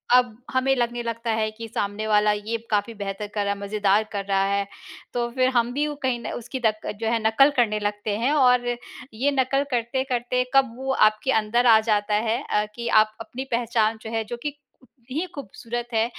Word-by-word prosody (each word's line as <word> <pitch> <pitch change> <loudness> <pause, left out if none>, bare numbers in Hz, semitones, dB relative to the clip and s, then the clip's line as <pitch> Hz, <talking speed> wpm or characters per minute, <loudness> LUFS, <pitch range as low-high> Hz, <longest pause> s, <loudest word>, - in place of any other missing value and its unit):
अब 245 -3 +3
हमें 265 +1 +2
लगने 240 -1 -1
लगता 230 0 -3
है 215 -1 0
कि 225 +1 -8
सामने 205 0 -3
वाला 210 0 +4
ये 210 +2 -2
काफ़ी 210 +2 +1
बेहतर 200 +1 -4
कर 205 0 -2
रहा 200 - +1
है, 200 - -10
मज़ेदार 205 +1 +2
कर 200 -2 -3
रहा 195 -1 +2
है, 200 0 0 0.5
तो 240 -1 -1
फिर 255 0 +2
हम 240 0 +2
भी 295 +2 0
उ 295 - -4
कहीं 250 -2 +1
न - - -5
उसकी 250 +2 -5
दक 215 0 0
जो 225 - -1
है 230 - +2
नकल 250 +6 +5
करने 215 -4 +2
लगते 205 0 -2
हैं। 250 +5 +1
और 250 -4 +4 0.5
ये 270 +6 +1
नकल 275 +1 +1
करते-करते 250 +1 0
कब 265 -4 +4
वो 265 0 -2 0.2
आपके 215 +5 -1
अंदर 240 +4 +1
आ 220 -1 +8
जाता 210 0 +2
है 235 +4 0
अ, 210 0 0
कि 235 0 -5
आप 215 -1 +4
अपनी 260 +3 -6
पहचान 230 -2 +1
जो 220 - -7
है 225 -1 -1
जो 240 +2 -6
कि 295 - -1 0.3
कितनी 255 +3 -8
ही 365 - -1
खूबसूरत 240 -1 -6
है 225 0 +3
230 Hz, 210 wpm, -24 LUFS, 215-250 Hz, 0.5 s, आ